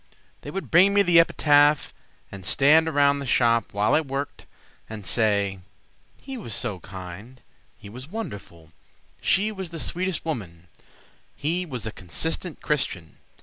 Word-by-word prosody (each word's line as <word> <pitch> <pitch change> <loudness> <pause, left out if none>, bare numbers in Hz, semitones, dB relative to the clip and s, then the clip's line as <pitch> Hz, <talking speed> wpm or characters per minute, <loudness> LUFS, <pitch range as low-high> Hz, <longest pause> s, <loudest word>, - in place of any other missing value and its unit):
They - - -8
would 195 - -6
bring 190 +4 +5
me 200 - +5
the 175 -3 +5
epitaph 145 -2 +3 0.4
And 100 -1 -9
stand 150 - +4
around 140 -2 +3
the 140 - -5
shop 115 -2 +2
while 105 +1 +1
I 160 - +4
worked 140 -1 -5 0.4
And 105 -3 -8
say 100 -4 +1 0.6
"He 270 -1 -8
was 115 - -5
so 105 -7 -4
kind," 95 +7 -10 0.4
"He 100 - -13
was 125 +6 -8
so - - -20
wonderful," 100 - -8 0.5
"She 210 +3 +2
was 190 -4 -6
the 165 0 -7
sweetest 185 +2 -3
woman," 90 - -6 0.7
"He 175 +5 -2
was 125 -7 -5
a 110 - -3
consistent 160 - -3
Christian." 95 - -1
135 Hz, 150 wpm, -24 LUFS, 100-165 Hz, 0.7 s, bring